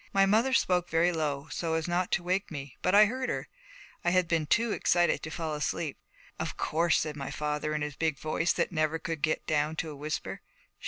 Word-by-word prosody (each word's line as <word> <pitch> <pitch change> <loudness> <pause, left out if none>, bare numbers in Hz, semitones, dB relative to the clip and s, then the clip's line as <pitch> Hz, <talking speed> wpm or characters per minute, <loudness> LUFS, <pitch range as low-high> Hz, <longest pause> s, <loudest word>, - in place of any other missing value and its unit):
My 195 0 +5
mother 220 +7 +3
spoke 180 -8 +2
very 170 +2 +3
low, 150 -3 -2
so 165 -1 -1
as 160 0 -1
not 175 +1 0
to 175 - +1
wake 185 +3 0
me, 140 -4 -7
but 185 - +2
I 210 +1 +9
heard 255 +4 -2
her. - - -3 0.6
I 175 - +3
had 180 0 +3
been 165 -3 0
too 230 +5 +2
excited 175 -3 +2
to 155 - -5
fall 160 -1 -3
asleep. 150 0 -2 0.4
'Of - - -3
course,' 165 0 +2
said 155 -1 -3
my 140 -2 -5
father 150 +1 -2
in 150 - -1
his 150 -1 -4
big 160 -3 0
voice 155 +4 0
that - - 0
never 155 -1 +1
could 165 -2 -4
get 155 - 0
down 155 0 0
to 160 0 -3
a - - -8
whisper. 150 +2 -4
160 Hz, 220 wpm, -29 LUFS, 150-180 Hz, 0.6 s, I